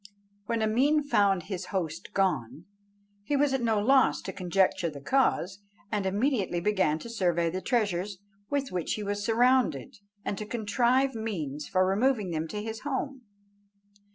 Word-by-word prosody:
When 230 -1 0
Ameen 275 +8 +3
found 200 - +2
his 185 0 -5
host 175 -3 -3
gone, 155 -6 0 0.6
he 285 +8 -1
was 280 -1 +2
at 265 - 0
no 225 -3 +2
loss 265 +5 +4
to - - -5
conjecture 185 -1 +1
the 145 -2 -9
cause, 195 - +1 0.3
and 205 -2 0
immediately 205 -3 0
began 185 -5 +1
to 200 - -9
survey 175 -7 0
the 185 +2 -3
treasures 205 -5 0 0.3
with 280 -2 -1
which 180 -3 -2
he 215 - -5
was 205 0 -2
surrounded, 235 - +2 0.3
and 200 - -2
to 210 - -4
contrive 245 +4 +1
means 160 - -4
for 185 0 +2
removing 210 0 +1
them 160 0 -2
to 210 +4 -5
his 220 0 -5
home. 275 -1 -3
205 Hz, 155 wpm, -28 LUFS, 180-245 Hz, 0.6 s, loss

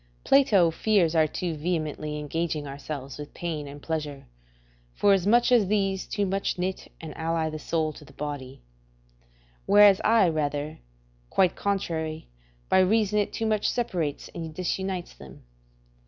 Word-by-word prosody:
Plato 205 -11 +4
fears 180 -2 +2
our 160 -1 +4
too 175 +2 -3
vehemently 155 -2 -3
engaging 155 0 -2
ourselves 140 -1 -7
with 145 0 -9
pain 160 -4 -4
and 140 +1 -9
pleasure, 150 -3 -4 0.7
forasmuch 205 +6 +3
as 230 -6 +5
these 195 -2 0
too 205 -1 -1
much 195 0 -1
knit 185 +1 -4
and 160 -2 -8
ally 160 -1 -1
the 155 - -6
soul 155 0 -1
to 150 - -13
the 135 - -16
body; 140 - -6 1.0
whereas 205 -1 +7
I 220 -4 +5
rather, 150 -2 -2 0.5
quite 185 -2 +2
contrary, 160 -6 -2 0.4
by 190 - +4
reason 210 +2 +3
it 205 - 0
too 225 - -3
much 215 -1 +1
separates 175 - -2
and 160 -2 -7
disunites 185 0 -3
them. 65 -1 -14
165 Hz, 140 wpm, -26 LUFS, 150-195 Hz, 1.0 s, whereas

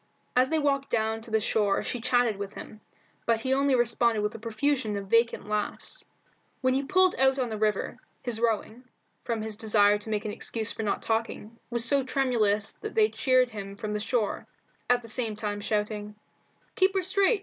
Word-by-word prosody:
As 255 +1 +4
they 320 - +1
walked 280 -2 +1
down 220 0 0
to 230 - -10
the 220 0 +2
shore 210 -2 +1
she 245 - -3
chatted 245 -3 +2
with 200 0 -6
him, 215 - -10 0.5
but 230 -1 +2
he 260 +2 +1
only 275 0 +3
responded 235 -2 +2
with 210 +1 -1
a 225 - -8
profusion 230 0 -1
of 200 - -5
vacant 230 +1 +2
laughs. 210 0 -3 0.6
When 255 0 +2
he 265 - +2
had 275 - -6
pulled 370 -1 +4
out 265 0 +5
on 255 -3 0
the 220 - -4
river, 210 -2 0 0.2
his 240 -3 -3
rowing, 230 +1 -1 0.4
from 230 -2 -2
his 220 -1 -4
desire 210 -2 +4
to 215 - -9
make 215 0 -1
an 210 - -2
excuse 225 +1 -3
for - - -5
not 210 -2 -1
talking, 225 0 -2
was 235 -1 -1
so 280 +2 +2
tremendous 230 -6 +1
that 430 - -6
they 435 -1 +5
cheered 255 -2 +2
him 200 -2 -7
from 210 +1 -4
the 210 - -1
shore, 220 0 -1 0.4
at 245 -1 +3
the - - -10
same 225 -1 -3
time 205 -1 -3
shouting 210 0 -2 0.6
"Keep 385 +1 +2
her 380 - +1
straight! 395 +4 +2
230 Hz, 205 wpm, -28 LUFS, 210-255 Hz, 0.6 s, out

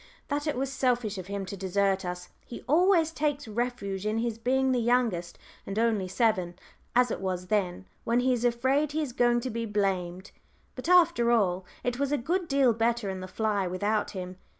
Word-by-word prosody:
that 290 +1 -1
it 300 - 0
was 270 +1 -2
selfish 240 -6 0
of 185 - -8
him 200 -1 -4
to 195 - -6
desert 195 0 0
us. 180 0 -5
He 235 - -9
always 335 +1 +4
takes 290 -3 -2
refuge 215 -4 -3
in 215 +1 -1
his 230 -1 -2
being 265 +2 +1
the 250 - +2
youngest 230 -8 0 0.3
and 195 - -6
"only 220 -4 +1
seven," 185 -4 0 0.4
as 250 -1 +4
it - - -3
was 185 -1 -2
then, 190 -3 0 0.2
when 235 +2 +2
he 255 0 +2
is 240 -1 -2
afraid 260 +5 +1
he 315 0 0
is 260 -5 -5
going 240 0 +3
to 255 - -4
be 230 +1 -3
blamed. 190 -3 -2 0.4
But, - - -6
after 335 -10 +5
all, 190 -6 +2 0.2
it 245 0 -2
was 280 0 0
a 290 - +2
good 345 +8 -1
deal 275 -4 +3
better 230 -2 0
in 190 - -5
the 185 - -6
fly 205 -1 -1
without 205 +4 -1
him. 185 0 -6
230 Hz, 200 wpm, -28 LUFS, 195-255 Hz, 0.4 s, after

